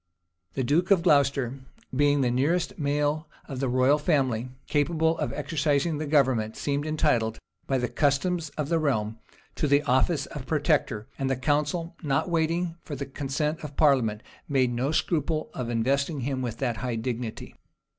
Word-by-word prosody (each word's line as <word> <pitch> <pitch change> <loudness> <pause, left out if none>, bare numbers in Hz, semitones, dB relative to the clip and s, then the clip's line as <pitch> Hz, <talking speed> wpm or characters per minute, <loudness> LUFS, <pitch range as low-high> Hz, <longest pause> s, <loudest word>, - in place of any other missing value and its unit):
[*] 85 +1 -49
The 130 - 0
duke 160 +8 +2
of 190 -4 +4
Glocester, 140 -5 +2 0.4
being 145 +1 +3
the 125 -2 +2
nearest 170 +9 0
male 145 +2 0 0.2
of 135 -3 -5
the 135 -1 0
royal 130 +4 +3
family 130 -6 +1 0.2
capable 160 +2 +1
of - - -1
exercising 150 +1 0
the 155 - -3
government, 130 -7 +2
seemed 145 +1 -1
entitled, 135 -8 +1 0.3
by 135 - +1
the 125 -1 0
customs 155 +4 0
of 150 -2 -1
the 165 - +2
realm, 110 -7 -1 0.3
to 150 - -1
the 145 +1 +4
office 135 +3 +2
of 135 -3 -8
protector; 145 -7 +1
and 135 -1 0
the 135 - +1
council, 150 +6 -1
not 145 +3 0
waiting 165 +1 0
for 145 - -6
the 140 +1 -4
consent 145 +3 -2
of 145 -2 -8
parliament, 125 -8 +3 0.3
made 130 -3 +2
no 130 +5 0
scruple 155 -1 0
of 125 -2 -4
investing 140 +5 0
him 130 +1 -2
with 120 -3 -3
that 120 -3 -1
high 120 +2 -2
dignity. 115 0 -4
140 Hz, 170 wpm, -27 LUFS, 125-155 Hz, 0.4 s, of